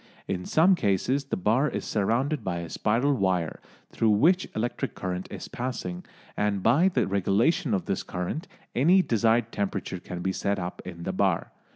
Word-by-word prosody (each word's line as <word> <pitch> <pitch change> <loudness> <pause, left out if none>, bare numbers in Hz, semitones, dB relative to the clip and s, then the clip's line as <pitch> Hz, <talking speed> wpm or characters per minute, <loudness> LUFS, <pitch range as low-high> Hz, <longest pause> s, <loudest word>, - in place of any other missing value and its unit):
In 90 -2 -3
some 170 +5 +5
cases 130 - +1
the - - -2
bar 115 +10 +2
is - - -4
surrounded 120 +8 0
by 90 -2 -2
a 85 -1 -6
spiral 120 +7 +1
wire 95 - 0 0.3
through 115 - +1
which 165 - +3
electric 120 +3 -2
current 90 -1 -4
is - - -7
passing, 100 -8 -4 0.3
and 105 -2 0
by 145 +11 +5
the 190 - +1
regulation 105 - +2
of 95 - -2
this - - -1
current 90 - -4 0.3
any 175 +9 +5
desired 115 - +2
temperature 95 -2 -3
can 90 0 -7
be 95 - 0
set 100 +1 -1
up 90 0 -5
in 85 -2 -8
the 95 - -2
bar. 95 -3 +1
105 Hz, 175 wpm, -27 LUFS, 95-135 Hz, 0.3 s, some